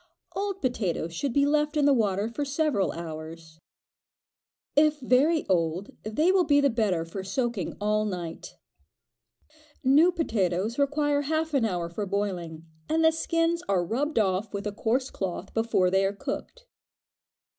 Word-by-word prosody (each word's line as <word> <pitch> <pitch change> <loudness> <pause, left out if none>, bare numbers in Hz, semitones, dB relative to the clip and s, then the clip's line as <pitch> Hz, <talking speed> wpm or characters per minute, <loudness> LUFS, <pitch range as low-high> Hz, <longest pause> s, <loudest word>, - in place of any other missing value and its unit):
Old 390 -2 -3
potatoes 190 -9 -1
should 275 +10 -2
be 280 +3 +3
left 300 +1 +1
in 290 - +3
the 285 - +5
water 205 -4 +1
for 235 +6 -3
several 280 -7 0
hours. 160 -1 -8 1.2
If 300 +1 +4
very 280 +5 +3
old, 175 +1 0
they 300 - +1
will 380 -1 +4
be 285 -3 +4
the 280 -1 +3
better 200 -8 0
for 190 +3 -6
soaking 220 -1 -2
all 210 +1 +1
night. 175 -5 -6 1.3
New 295 +7 +5
potatoes 220 - -1
require 290 0 +1
half 315 +2 -1
an 265 -5 +3
hour 175 -5 -1
for 200 +4 -4
boiling, 180 -5 -3 0.2
and 320 +1 +2
the 320 - +6
skins 330 +1 0
are 185 -3 +2
rubbed 275 - -2
off 195 0 +1
with 200 - -4
a 210 - -1
coarse 240 +5 -1
cloth 190 0 -5
before 225 -5 +2
they 190 +1 +3
are 195 +1 +1
cooked. - - -6
225 Hz, 155 wpm, -27 LUFS, 185-290 Hz, 1.3 s, the